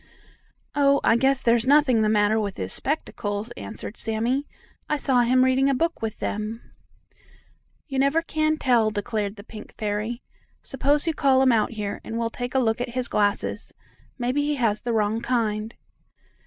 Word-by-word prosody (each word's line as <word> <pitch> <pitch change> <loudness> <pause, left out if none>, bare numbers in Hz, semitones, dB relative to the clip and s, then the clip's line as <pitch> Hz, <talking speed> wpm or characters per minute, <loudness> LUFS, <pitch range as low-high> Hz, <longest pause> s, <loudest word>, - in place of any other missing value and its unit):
"Oh, 280 -1 +4
I - - +4
guess 265 +2 +2
there's 235 0 +2
nothing 280 -5 +4
the 215 - +2
matter 210 +1 +3
with 200 -3 -3
his 95 0 -3
spectacles," 220 -7 -3
answered 225 -2 -8
Sammie. 235 +6 -1 0.4
"I 300 - +1
saw 260 -4 +2
him 255 +2 +4
reading 265 +1 +3
a 275 - +2
book 335 +5 -1
with 220 -1 -3
them." 215 +2 -4 1.2
"You 270 -3 -2
never 280 +5 +2
can 310 -1 0
tell," 240 -6 +3
declared 205 -1 -3
the 200 - -11
pink 215 -1 -11
fairy. 215 +3 -3 0.4
"Suppose 285 +3 +1
you 325 - 0
call 265 -2 +3
him 260 - +5
out 225 0 +1
here, 210 -2 -4
and 225 - -5
we'll 230 -1 -1
take 245 +2 -5
a - - +4
look 225 -1 +1
at 245 - -2
his 255 -1 -1
glasses. 205 -1 -1 0.4
Maybe 250 +3 0
he 295 0 0
has 220 -5 +1
the 240 - -2
wrong 220 0 0
kind." 225 -2 -1
240 Hz, 175 wpm, -24 LUFS, 215-270 Hz, 1.2 s, him